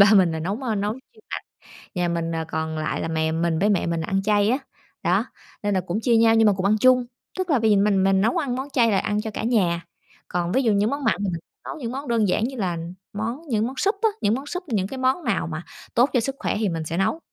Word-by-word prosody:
ba 200 - +10
mình 180 -5 +5
là 160 - -2
nấu, 195 +8 -2
ơ, 225 -4 -1
nấu 205 +1 0
chuyên 430 - -16
mặn. - - -4 0.5
Nhà 175 -1 +1
mình, 170 -1 -1
ờ, 160 -1 -2
còn 160 0 -3
lại 155 0 -2
là - - -2
mẹ 160 0 0
mình, 165 0 0
với 205 +2 +3
mẹ 200 - +2
mình 170 -1 -1
là 160 - -5
ăn 195 0 +1
chay 205 0 +3
á. 255 - +3 0.5
Đó, - - +2 0.4
nên 205 -1 +1
là 185 - +1
cũng 180 +5 -2
chia 235 0 +3
nhau 225 0 +5
nhưng 225 0 +5
mà 205 - +5
cùng 185 - -1
ăn 210 +2 +4
chung. 255 +2 +5 0.3
Tức 370 -2 -2
là 275 -5 +3
bây 220 -1 +3
giờ 205 - +5
mình 195 -2 +3
mình 195 0 +3
nấu 225 +3 +2
ăn 260 -5 -1
món 265 +2 -4
chay 230 -4 +4
là 195 - +3
ăn 210 0 -1
cho 220 -1 -5
cả - - -4
nhà, 185 -8 +2 0.5
còn 175 0 -1
ví 265 +7 +2
dụ 225 - +3
những 205 +2 +2
món 280 +1 -3
mặn 225 - +3
thì - - -2
mình 170 - -3 0.3
nấu - - -5
những 240 -5 -4
món 275 +2 -5
đơn 230 -3 +2
giản 190 +4 +1
như 260 +2 -2
là 180 -5 -1 0.4
món 230 +8 -3
những 225 -2 +1
món 265 - -6
súp 400 - +2
á, 445 - +4
những 205 - +2
món 270 +2 -5
súp, 360 +5 -4
những 200 -6 0
cái 265 - -7
món 260 +6 +1
nào 220 -7 0
mà 160 +1 -5 0.3
tốt 245 +4 +4
cho 250 - +4
sức 270 +4 -2
khỏe - - -1
thì 210 -4 +1
mình 165 -1 -3
sẽ 165 +2 -3
nấu. 195 +12 +1
210 Hz, 295 wpm, -24 LUFS, 180-250 Hz, 0.5 s, ba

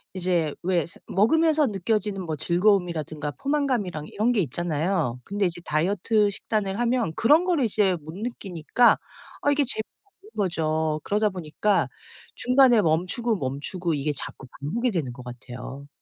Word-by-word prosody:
이제 175 -5 0
왜 175 -3 +1
스 170 - -11
먹으면서 310 - +3
느껴지는 205 -1 -1
뭐 155 - -2
즐거움이라든가 170 -4 +1
포만감이랑 255 - 0
이런 225 +4 +1
게 215 -5 +2
있잖아요. 155 -3 -1
근데 200 -1 0
이제 175 0 -5
다이어트 200 +6 +2
식단을 200 0 -2
하면 240 -8 +1
그런 300 +9 +4
거를 330 -9 +2
이제 200 -4 +2
못 155 +2 -10
느끼니까 210 -1 +1 0.4
아 290 - +3
이게 285 0 +3
재미없는 390 - -5
거죠. 160 -4 0
그러다 210 +1 +1
보니까 185 +3 0 0.5
중간에 250 -3 +5
멈추고 185 +8 +1
멈추고 150 +5 -2
이게 145 +1 -1
자꾸 135 - -7 0.2
반복이 235 - -1
되는 150 -9 -2
것 125 0 -10
같아요. 125 +3 -9
190 Hz, 350 characters per minute, -25 LUFS, 155-230 Hz, 0.5 s, 중간에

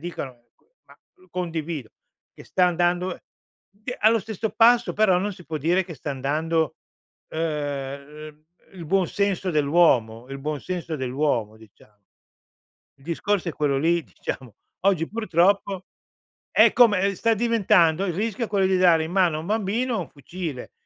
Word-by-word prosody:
dicono, 170 -5 -5 0.6
ma, - - -19 0.2
uhm, 370 0 -23
condivido, 165 -7 -4 0.4
che - - -13
sta 180 -1 +2
andando 175 +1 0
e - - -16 0.5
d 215 +5 -7
allo 225 +2 +4
stesso 220 0 -4
passo, 240 +1 +4
però, 200 -4 +3
non 205 +2 -2
si 180 -2 -14
può 155 -1 -4
dire 175 +5 +1
che 170 -3 -9
sta 145 +2 -6
andando 155 +3 -1 0.5
uhm, 150 -1 -5 0.3
il 175 -3 -9
buon 185 +3 +1
senso 195 0 -1
dell'uomo, 140 -7 +2
il 135 0 -6
buon 150 +1 -4
senso 175 -3 -4
dell'uomo, 125 -5 -1
dicia 105 -1 -20 1.0
Discorso 170 +5 -2
è - - -9
quello 145 -3 0
lì, 170 +3 +2
diciamo. 125 -6 -7 0.3
Oggi, 180 -5 +2
purtroppo, 195 -2 +1 0.7
è - - +5
come 210 -6 +5
uhm, - - -1
sta 225 +5 +1
diventando 195 -6 +3
il 175 - -2
rischio 225 +4 -2
è - - -15
quello 195 -2 +2
di 190 0 +2
dare 170 -3 +5
in 160 - -6
mano 180 -5 +3
a - - -4
un 160 - -8
bambino 220 +3 -1
un - - -6
fucile 155 -2 -7
170 Hz, 160 wpm, -24 LUFS, 150-195 Hz, 1.0 s, è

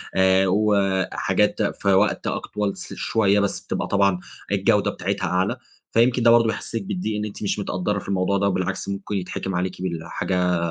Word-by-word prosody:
آآ 95 0 +4
وحاجات 100 -1 +1
في 100 - -2
وقت 100 +3 +2
أك - - -2
طول 105 -1 -2
س - - -8
شويّة، 105 -2 +2
بس 100 -1 -1
بتبقى - - -3
طبعًا 100 -2 +2 0.3
الجودة - - +2
بتاعتها - - -2
أعلى. 90 +2 0 0.3
فيمكن 120 +1 +3
ده 115 - +7
برضه 115 -1 +5
بيحسّسِك 110 0 -3
بالضّيق، 95 +3 -3
إن 105 - -2
أنتِ 105 0 -7
مش 105 - -1
متقدّرة 100 +1 -1
في - - -12
الموضوع 95 +1 +1
ده، 100 - +1
وبالعكس 95 0 -2
ممكن 100 +1 -4
يتحِكِم 95 0 -3
عليكِ 90 +1 -2
بالحاجة 90 +1 -1
100 Hz, 175 wpm, -23 LUFS, 95-105 Hz, 0.3 s, ده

